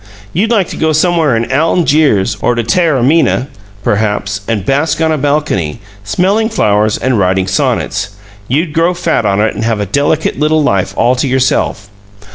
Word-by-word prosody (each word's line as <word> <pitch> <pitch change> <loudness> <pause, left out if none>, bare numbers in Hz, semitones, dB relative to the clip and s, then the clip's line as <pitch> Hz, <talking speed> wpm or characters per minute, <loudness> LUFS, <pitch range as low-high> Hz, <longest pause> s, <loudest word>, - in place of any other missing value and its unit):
You'd 205 +7 0
like 210 -7 +2
to - - -7
go 160 0 +1
somewhere 160 -4 +2
in 115 +3 -3
Algiers, 150 - +2
or 120 - +1
to 120 - -1
Taormina, 150 - +1 0.3
perhaps, 105 -1 -1
and 105 -5 -2
bask 145 +5 0
on 160 -1 +1
a 155 - 0
balcony, 140 - -1 0.2
smelling 195 - 0
flowers 105 - +1
and 130 -4 0
writing 95 0 +1
sonnets. 95 +1 -1 0.4
You'd 150 +5 -1
grow 170 +2 +1
fat 165 -10 0
on 100 0 +1
it 110 +1 +1
and - - -4
have 115 -1 0
a 105 - -1
delicate 145 - 0
little 155 0 +2
life 100 -8 0
all 125 +2 +3
to 135 - 0
yourself. 130 -6 0
135 Hz, 170 wpm, -12 LUFS, 105-160 Hz, 0.4 s, all